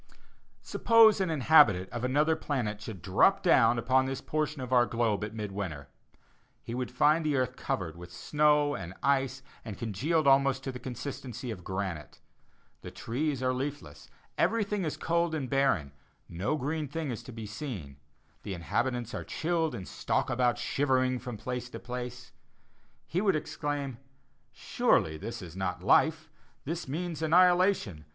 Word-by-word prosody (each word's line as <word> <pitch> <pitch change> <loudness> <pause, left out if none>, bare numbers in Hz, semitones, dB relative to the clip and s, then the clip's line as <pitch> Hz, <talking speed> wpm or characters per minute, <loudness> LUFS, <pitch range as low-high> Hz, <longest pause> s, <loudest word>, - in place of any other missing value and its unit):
Suppose 225 -3 +5
an 185 - 0
inhabitant 140 - +5
of 120 - -5
another 150 +5 +2
planet 115 -9 -3
should 100 -6 -8
drop 95 - +3
down 120 - +5
upon 130 +3 +2
this 135 0 -3
portion 155 0 -2
of 130 0 -4
our 120 -2 +5
globe 110 -2 0
at 105 +1 -5
mid 105 -2 -4
winter. 90 -8 -5 0.7
He 115 - -6
would 125 0 -3
find 150 +6 +3
the 150 -2 +1
earth 130 -1 0
covered 85 -10 -3
with 85 0 -11
snow 150 - +2
and 95 -4 -6
ice 135 -1 +1 0.2
and 105 -5 -7
congealed 140 - 0
almost 135 -1 +4
to 135 - -3
the 125 - -8
consistency 125 -1 -6
of 90 -5 -8
granite. 95 -6 -5 0.6
The - - -8
trees 135 +2 -3
are 130 0 +2
leafless, 130 - -6 0.3
everything 210 -4 +1
is 155 - -3
cold 170 -1 0
and 140 -4 -3
barren; 130 - +1 0.4
no 90 - -2
green 150 +2 -2
thing 150 0 -4
is 115 - -5
to - - -11
be 115 -2 -7
seen; 105 - -7 0.4
the 100 - -5
inhabitants 120 +7 -2
are - - -4
chilled, 165 -1 -1
and 95 - -7
stalk - - -1
about 120 -2 +2
shivering, 130 -2 +1
from 120 -3 -7
place 125 +3 -5
to - - -8
place; 125 0 -7 0.7
he 180 - -1
would 200 -4 +2
exclaim, 145 -4 -3 0.5
"Surely 80 -1 +1
this 115 +1 -6
is 85 -1 -10
not 90 -1 -3
life; 160 +9 +3 0.4
this 165 +2 -4
means 165 +3 -4
annihilation. 175 - +3
130 Hz, 160 wpm, -29 LUFS, 105-150 Hz, 0.7 s, Suppose